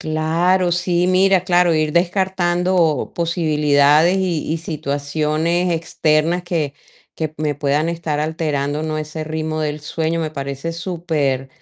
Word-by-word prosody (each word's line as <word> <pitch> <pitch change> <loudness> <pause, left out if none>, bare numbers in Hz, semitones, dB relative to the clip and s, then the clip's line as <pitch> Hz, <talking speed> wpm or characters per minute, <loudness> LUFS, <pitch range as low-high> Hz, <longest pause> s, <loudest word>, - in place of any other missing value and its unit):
¡Claro!, 170 +4 +1
sí, 175 0 +1
mira, 185 0 +3
claro, 175 -2 +3
ir 155 -1 +1
descartando 175 -3 +1
posibilidades 155 -1 +3
y 180 -5 -1
y 165 - -1
situaciones 155 +3 -1
externas 165 +1 +1
que 160 -5 -2 0.4
que 155 -2 -3
me 150 -1 -1
puedan 145 +3 0
estar 165 -3 -2
alterando, 150 -2 -1
¿no?, 155 -1 -2
ese 155 +1 -5
ritmo 155 0 -3
del 150 0 -2
sueño 160 +2 -2
me 160 -2 -2
parece 140 +3 -4
super, 160 -6 -2
160 Hz, 130 wpm, -19 LUFS, 150-175 Hz, 0.4 s, mira